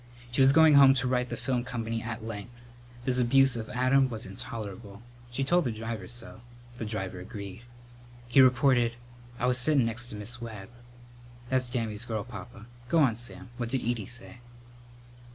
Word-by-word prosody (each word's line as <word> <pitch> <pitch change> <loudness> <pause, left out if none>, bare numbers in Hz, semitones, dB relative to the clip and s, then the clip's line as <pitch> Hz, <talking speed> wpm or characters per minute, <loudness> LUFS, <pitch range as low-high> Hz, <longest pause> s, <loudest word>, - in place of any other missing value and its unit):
She 130 - +1
was 135 0 +7
going 160 +1 +6
home 135 -1 +8
to 130 -1 +1
write 125 0 0
the 120 - -4
film 125 -1 -1
company 115 -2 -3
at 110 -1 -6
length. 115 +2 -8 0.4
This 125 -1 +2
abuse 130 +1 +4
of 110 -2 -5
Adam 130 +1 +3
was 115 0 -5
intolerable. 105 -1 -7 0.3
She 120 +3 -2
told 175 +6 +3
the 125 - -1
driver 110 -3 -5
so. 120 -1 -6 0.4
The 115 - -3
driver 95 -4 -4
agreed. 100 +2 -8 0.7
He 120 +3 +6
reported, 125 -2 +4 0.4
"I 120 - -1
was 125 0 +2
settin' 135 0 +3
next 115 +1 -1
to 110 - -7
Miss 115 +4 -4
Webb." 110 -5 -8 0.8
"That's 130 -1 +1
Dammy's 115 -2 -2
girl, 110 -3 -3
Papa. 110 0 -10 0.2
Go 170 - +3
on, 135 -8 +4
Sam. 120 +1 -6
What 120 -2 -3
did 130 -2 -2
Edie 115 -4 -1
say?" 120 -1 -8
120 Hz, 175 wpm, -29 LUFS, 110-130 Hz, 0.8 s, home